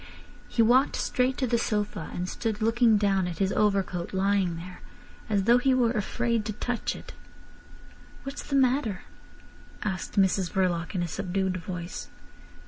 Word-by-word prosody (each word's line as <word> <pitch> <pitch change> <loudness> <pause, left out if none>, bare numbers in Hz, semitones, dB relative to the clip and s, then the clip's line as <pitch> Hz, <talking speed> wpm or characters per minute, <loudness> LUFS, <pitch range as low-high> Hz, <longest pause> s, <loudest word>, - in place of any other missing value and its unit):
He 230 - +2
walked 255 +5 +4
straight 255 +1 0
to 265 - +1
the 235 -1 +1
sofa, 210 -2 -2
and 180 +1 -3
stood 220 +2 -3
looking 225 0 +4
down 195 -3 +2
at 170 -2 -5
his 195 -1 +1
overcoat 195 -4 0
lying 190 -2 +1
there, 180 +2 -9 0.5
as 200 -2 +2
though 235 +4 +5
he 260 +1 +3
were 240 -3 +3
afraid 235 0 0
to 215 - -3
touch 245 +2 -2
it. - - -10 1.1
"What's 275 +1 -6
the 280 - -3
matter?" 255 -6 +2 0.8
asked 190 -4 -3
Mrs 190 -2 +2
Verloc 175 -2 0
in 175 - 0
a - - -2
subdued 185 +3 -2
voice. 175 0 -6
205 Hz, 155 wpm, -27 LUFS, 185-235 Hz, 1.1 s, though